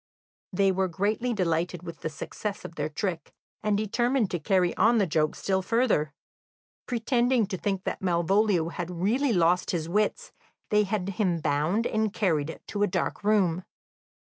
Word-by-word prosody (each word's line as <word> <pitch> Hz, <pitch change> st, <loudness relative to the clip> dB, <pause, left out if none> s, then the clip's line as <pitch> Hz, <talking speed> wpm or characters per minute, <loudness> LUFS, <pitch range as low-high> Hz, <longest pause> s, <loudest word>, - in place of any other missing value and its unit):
They 195 Hz, +1 st, +3 dB
were 190 Hz, 0 st, +1 dB
greatly 205 Hz, +7 st, -1 dB
delighted 175 Hz, -3 st, -1 dB
with 170 Hz, -2 st, -8 dB
the -, -, -3 dB
success 205 Hz, +7 st, -6 dB
of -, -, -7 dB
their 150 Hz, -1 st, -3 dB
trick, 175 Hz, 0 st, -3 dB, 0.3 s
and 210 Hz, -1 st, +1 dB
determined 240 Hz, +2 st, +1 dB
to 175 Hz, -, -1 dB
carry 180 Hz, +2 st, +1 dB
on 230 Hz, +4 st, +4 dB
the 205 Hz, -, +3 dB
joke 155 Hz, -2 st, 0 dB
still 190 Hz, -1 st, 0 dB
further. 215 Hz, -8 st, +1 dB, 0.8 s
Pretending 240 Hz, 0 st, +2 dB
to 195 Hz, -1 st, -4 dB
think 195 Hz, -2 st, -2 dB
that -, -, -3 dB
Malvolio 180 Hz, 0 st, +2 dB
had 175 Hz, 0 st, -5 dB
really 215 Hz, +11 st, +1 dB
lost 175 Hz, -2 st, +2 dB
his 165 Hz, -3 st, -1 dB
wits, 210 Hz, -, 0 dB, 0.4 s
they 210 Hz, 0 st, +4 dB
had 195 Hz, -2 st, -2 dB
him 190 Hz, -4 st, 0 dB
bound 155 Hz, +9 st, 0 dB
and 220 Hz, -2 st, 0 dB
carried 165 Hz, -8 st, -1 dB
to 205 Hz, -, -4 dB
a 205 Hz, -, +4 dB
dark 185 Hz, +2 st, -2 dB
room. 190 Hz, -5 st, +2 dB
190 Hz, 165 wpm, -27 LUFS, 170-215 Hz, 0.8 s, on